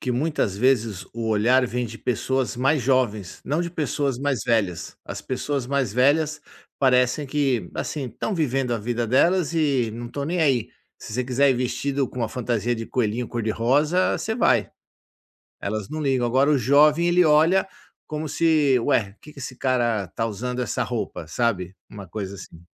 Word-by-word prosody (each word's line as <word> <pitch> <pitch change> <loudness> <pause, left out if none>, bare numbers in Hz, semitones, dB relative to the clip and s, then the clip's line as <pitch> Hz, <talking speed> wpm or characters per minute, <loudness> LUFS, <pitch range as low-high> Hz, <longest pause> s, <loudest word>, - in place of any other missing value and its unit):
que 125 - -2
muitas 125 - -1
vezes 115 -5 +1
o 115 -1 -3
olhar 120 +4 +3
vem 125 0 -2
de 115 0 -9
pessoas 130 +1 -1
mais 135 +2 +2
jovens, 115 -8 0
não 155 +4 0
de 170 - -4
pessoas 145 -5 -1
mais 140 -3 -1
velhas. 105 -8 -1
As - - -6
pessoas 135 0 -3
mais 135 -5 0
velhas 150 +5 +2 0.4
parecem 125 +2 +2
que, 135 - 0
assim, 145 -4 -3
estão 200 - -4
vivendo 135 -6 0
a - - -2
vida 120 +2 -2
delas 170 +7 +2
e 140 -8 +1
não 120 +1 -6
estão 140 +4 -5
nem 175 +3 -1
aí. 135 -7 +2 0.3
Se - - -9
você 125 +1 -1
quiser 135 +2 +3
ir - - +2
vestido 135 +2 -1
com - - -9
uma 115 -2 -1
fantasia 120 0 -1
de 115 0 -6
coelhinho 120 0 -1
cor-de-rosa, 130 +10 +1
você 220 - -2
vai. 235 - +2 0.9
Elas 105 0 -3
não 155 - -4
ligam, 135 -4 +1
agora 130 +4 +3
o 150 - +4
jovem 150 +7 +4
ele 180 +1 +4
olha 160 +5 +4 0.4
como 155 0 -4
se: 150 -4 +3
"Ué, 100 -3 +1
que 150 - -13
esse 130 -2 -7
cara 120 -6 0
tá 95 +5 -3
usando 125 +4 -3
essa 120 - -1
roupa?", 105 -7 -4
sabe, 95 -1 -1
uma 100 -2 -9
coisa 100 0 -5
assim. 85 -3 -12
125 Hz, 175 wpm, -23 LUFS, 115-145 Hz, 0.9 s, o